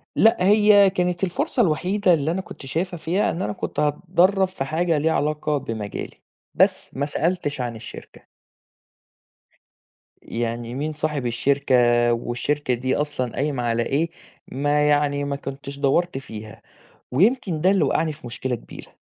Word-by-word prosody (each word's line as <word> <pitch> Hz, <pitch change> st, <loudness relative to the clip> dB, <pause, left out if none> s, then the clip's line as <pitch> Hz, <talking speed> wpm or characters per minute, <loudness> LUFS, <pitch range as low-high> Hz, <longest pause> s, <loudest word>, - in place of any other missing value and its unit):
لأ 225 Hz, -, +5 dB
هي 205 Hz, -1 st, +6 dB
كانت 180 Hz, -1 st, -1 dB
الفرصة 250 Hz, -, 0 dB
الوحيدة 185 Hz, +2 st, +2 dB
اللي 155 Hz, -1 st, +1 dB
أنا 185 Hz, +3 st, -2 dB
كنت 160 Hz, -, -12 dB
شايفها 175 Hz, +6 st, -2 dB
فيها، 175 Hz, +5 st, 0 dB
إن 170 Hz, -, -4 dB
أنا 105 Hz, -, -2 dB
كنت -, -, -5 dB
هاتدرب 180 Hz, +6 st, +2 dB
في 185 Hz, -7 st, -5 dB
حاجة 165 Hz, +3 st, 0 dB
ليها 160 Hz, +2 st, +1 dB
علاقة 150 Hz, 0 st, 0 dB
بمجالي، 110 Hz, -6 st, -6 dB, 0.3 s
بس -, -, +2 dB
ما 140 Hz, -, -1 dB
سألتش 150 Hz, -2 st, -1 dB
عن 120 Hz, -2 st, -3 dB
الشركة. 110 Hz, +1 st, -11 dB, 2.0 s
يعني 120 Hz, 0 st, -4 dB
مين 150 Hz, +3 st, -2 dB
صاحب 150 Hz, -3 st, -2 dB
الشركة 135 Hz, +3 st, +1 dB, 0.4 s
والشركة 125 Hz, +4 st, -1 dB
دي 130 Hz, +2 st, -1 dB
أصلًا 145 Hz, -5 st, -2 dB
قايمة 140 Hz, -3 st, -1 dB
على 115 Hz, 0 st, +1 dB
إيه، 155 Hz, +7 st, 0 dB, 0.4 s
ما 145 Hz, +2 st, +1 dB
يعني 145 Hz, -1 st, +2 dB
ما 140 Hz, 0 st, -2 dB
كنتش 140 Hz, 0 st, -7 dB
دوّرت 145 Hz, +3 st, +1 dB
فيها 110 Hz, -5 st, -9 dB, 0.5 s
ويمكن 190 Hz, -, +2 dB
ده 185 Hz, +4 st, +4 dB
اللي 195 Hz, -1 st, +3 dB
وقعني 160 Hz, -1 st, +1 dB
في 145 Hz, -4 st, -12 dB
مشكلة 125 Hz, +2 st, -3 dB
كبيرة. 120 Hz, -, -11 dB
150 Hz, 150 wpm, -23 LUFS, 130-175 Hz, 2.0 s, هي